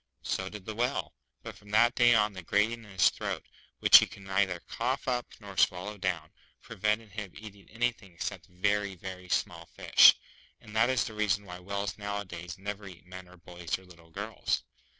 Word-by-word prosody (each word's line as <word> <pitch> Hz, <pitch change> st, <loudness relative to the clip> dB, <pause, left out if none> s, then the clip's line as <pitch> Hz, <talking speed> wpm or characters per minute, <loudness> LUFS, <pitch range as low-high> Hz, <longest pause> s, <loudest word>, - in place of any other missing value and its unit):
So 95 Hz, 0 st, -2 dB
did 105 Hz, -2 st, -10 dB
the 110 Hz, -, -4 dB
Whale. 125 Hz, +5 st, -1 dB, 0.3 s
But -, -, -8 dB
from 105 Hz, -, -17 dB
that 115 Hz, +3 st, +4 dB
day 120 Hz, -2 st, +5 dB
on, 105 Hz, -1 st, +3 dB
the 95 Hz, -, -7 dB
grating 110 Hz, +6 st, +1 dB
in -, -, -14 dB
his 95 Hz, -4 st, +3 dB
throat, -, -, -4 dB, 0.4 s
which -, -, +10 dB
he -, -, 0 dB
could 100 Hz, -, -13 dB
neither 95 Hz, -2 st, 0 dB
cough 130 Hz, +4 st, -3 dB
up 125 Hz, -1 st, 0 dB
nor 100 Hz, -2 st, -10 dB
swallow 95 Hz, +4 st, +1 dB
down, 90 Hz, -3 st, -2 dB, 0.3 s
prevented 105 Hz, +2 st, -2 dB
him 105 Hz, -3 st, -7 dB
eating 100 Hz, -2 st, -12 dB
anything 115 Hz, -4 st, -2 dB
except -, -, -5 dB
very, 100 Hz, +2 st, 0 dB
very 90 Hz, 0 st, -8 dB
small 85 Hz, -1 st, -1 dB
fish; -, -, +7 dB, 0.4 s
and 105 Hz, -, -13 dB
that 115 Hz, +3 st, +4 dB
is 130 Hz, -3 st, +2 dB
the 110 Hz, -, -6 dB
reason 105 Hz, -1 st, 0 dB
why 90 Hz, -1 st, -8 dB
whales 100 Hz, +1 st, -4 dB
nowadays 95 Hz, -4 st, -5 dB
never 100 Hz, +1 st, -6 dB
eat 90 Hz, -2 st, -13 dB
men 90 Hz, 0 st, -10 dB
or 90 Hz, +1 st, -16 dB
boys 85 Hz, 0 st, -5 dB
or 95 Hz, -, -17 dB
little 85 Hz, -2 st, -17 dB
girls. 80 Hz, -, -2 dB
100 Hz, 190 wpm, -30 LUFS, 90-105 Hz, 0.4 s, which